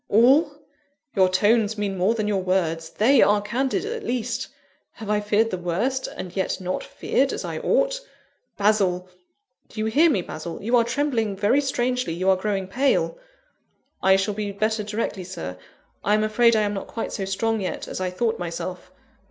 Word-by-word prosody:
"All? 265 Hz, +9 st, +5 dB, 0.7 s
your 190 Hz, -2 st, +4 dB
tones 215 Hz, +3 st, +2 dB
mean 205 Hz, -2 st, -2 dB
more 190 Hz, +5 st, +2 dB
than 215 Hz, -2 st, -1 dB
your 200 Hz, -2 st, +1 dB
words 165 Hz, -3 st, 0 dB
they 255 Hz, +10 st, +4 dB
are 205 Hz, 0 st, +5 dB
candid, 250 Hz, -, -1 dB
at 455 Hz, 0 st, -4 dB
least! 245 Hz, -, -2 dB, 0.5 s
Have 215 Hz, -2 st, -6 dB
I 210 Hz, -, +2 dB
feared 210 Hz, +2 st, +1 dB
the 185 Hz, -, -3 dB
worst, 220 Hz, +10 st, -1 dB
and 180 Hz, -1 st, -7 dB
yet 190 Hz, 0 st, -1 dB
not 185 Hz, 0 st, -3 dB
feared -, -, 0 dB
as -, -, -4 dB
I -, -, -4 dB
ought? -, -, +1 dB, 0.6 s
Basil! 195 Hz, -3 st, +2 dB, 0.6 s
do -, -, -9 dB
you 215 Hz, -, 0 dB
hear 295 Hz, +10 st, +4 dB
me, 195 Hz, -, +1 dB
Basil? 165 Hz, +1 st, -7 dB
You 235 Hz, +4 st, +1 dB
are 235 Hz, -, +5 dB
trembling 235 Hz, -4 st, -1 dB
very 210 Hz, +8 st, +3 dB
strangely; 250 Hz, -, -1 dB
you 185 Hz, +3 st, +2 dB
are -, -, +4 dB
growing 195 Hz, 0 st, -2 dB
pale!" 275 Hz, -, +1 dB, 0.8 s
"I 190 Hz, 0 st, +5 dB
shall 195 Hz, +2 st, 0 dB
be 205 Hz, 0 st, -3 dB
better 215 Hz, +2 st, 0 dB
directly, 210 Hz, -2 st, -3 dB
Sir. 175 Hz, -, -6 dB, 0.5 s
I 210 Hz, -, +3 dB
am 215 Hz, -, +1 dB
afraid 230 Hz, +2 st, +4 dB
I 215 Hz, -, +3 dB
am 205 Hz, 0 st, -1 dB
not 195 Hz, -, -5 dB
quite 230 Hz, -, -4 dB
so 195 Hz, -, -3 dB
strong 220 Hz, +3 st, -1 dB
yet 185 Hz, -, -4 dB
as -, -, -5 dB
I 185 Hz, -, 0 dB
thought 225 Hz, +5 st, -1 dB
myself. 175 Hz, +1 st, -5 dB
210 Hz, 185 wpm, -24 LUFS, 190-235 Hz, 0.8 s, All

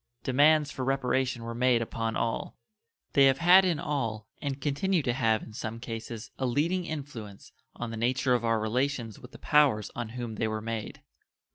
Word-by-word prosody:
Demands 150 Hz, +3 st, +4 dB
for 130 Hz, -, -4 dB
reparation 130 Hz, -2 st, 0 dB
were 115 Hz, 0 st, -5 dB
made 125 Hz, 0 st, +3 dB
upon 115 Hz, 0 st, -3 dB
all. 115 Hz, -1 st, -2 dB, 0.6 s
They 140 Hz, -2 st, +6 dB
have 135 Hz, -1 st, +4 dB
had 180 Hz, +5 st, +7 dB
in 175 Hz, -5 st, +1 dB
all, 115 Hz, -9 st, -3 dB
and 140 Hz, -1 st, -3 dB
continue 150 Hz, +5 st, 0 dB
to 125 Hz, -, 0 dB
have 115 Hz, -4 st, +1 dB
in 110 Hz, -, -11 dB
some, 115 Hz, 0 st, -5 dB
cases 115 Hz, -1 st, -7 dB
a 130 Hz, -, 0 dB
leading 170 Hz, +8 st, 0 dB
influence 135 Hz, -11 st, -7 dB, 0.2 s
on 120 Hz, -1 st, -5 dB
the 115 Hz, -, -5 dB
nature 125 Hz, +3 st, +1 dB
of 120 Hz, -2 st, +1 dB
our 115 Hz, -1 st, +2 dB
relations 120 Hz, 0 st, -1 dB
with 125 Hz, -, -13 dB
the -, -, -12 dB
powers 140 Hz, -9 st, +3 dB
on 120 Hz, -2 st, -4 dB
whom 115 Hz, -3 st, -5 dB
they 110 Hz, -, 0 dB
were 110 Hz, 0 st, -2 dB
made. 110 Hz, 0 st, -5 dB
125 Hz, 185 wpm, -28 LUFS, 115-140 Hz, 0.6 s, had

